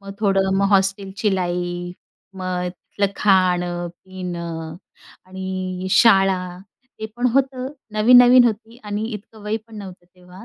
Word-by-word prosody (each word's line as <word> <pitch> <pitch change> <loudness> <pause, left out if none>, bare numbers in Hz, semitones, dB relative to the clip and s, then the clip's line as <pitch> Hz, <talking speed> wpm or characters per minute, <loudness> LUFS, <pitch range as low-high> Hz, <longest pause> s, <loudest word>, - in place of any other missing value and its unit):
मग 195 0 -9
थोडं 195 -2 +2
मग 200 - +2
हॉस्टेलची 195 +1 +1
लाईफ, 175 -1 -3 0.4
मग 180 -1 -3
तिथलं 195 +2 -4
खाणं, 180 -3 +1 0.2
पिणं 170 -3 -6 0.5
आणि 185 0 -5
शाळा 195 -6 +3 0.4
ते - - -2
पण 245 +1 +1
होतं, 265 -1 0 0.3
नवीन-नवीन 245 +3 +7
होती 225 +1 -2
आणि 205 +1 -3
इतकं 215 0 -10
वय 210 +1 -2
पण 225 -1 -13
नव्हतं 190 -3 -10
तेव्हा. 180 +2 -15
190 Hz, 125 wpm, -21 LUFS, 180-210 Hz, 0.5 s, नवीन-नवीन